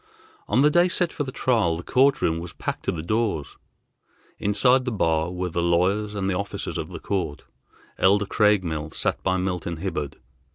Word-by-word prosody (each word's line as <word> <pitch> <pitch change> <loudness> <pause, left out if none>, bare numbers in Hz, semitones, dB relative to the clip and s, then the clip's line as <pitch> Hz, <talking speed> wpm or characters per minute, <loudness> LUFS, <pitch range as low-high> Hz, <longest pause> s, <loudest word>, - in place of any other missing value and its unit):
On 120 +7 +3
the 150 - +5
day 175 +3 +5
set 175 -1 0
for 145 - -2
the 130 - -6
trial 110 -12 +1
the 85 - -7
court 135 +6 +3
room 80 0 +1
was 85 0 -7
packed - - -5
to - - +1
the 80 -2 -5
doors. 105 -5 -1 0.8
Inside 125 +6 +3
the 125 - -1
bar 80 -5 +1
were 90 0 -3
the 85 +1 -1
lawyers 95 +5 +1
and 95 -2 -1
the 95 - 0
officers 100 +2 -4
of - - -5
the - - -7
court. 90 -7 -3 0.6
Elder 100 +2 +4
Craigmile 90 -8 +1
sat - - -1
by 95 0 +1
Milton 90 -3 -2
Hibbard. 80 -5 -4
95 Hz, 190 wpm, -24 LUFS, 85-110 Hz, 0.8 s, the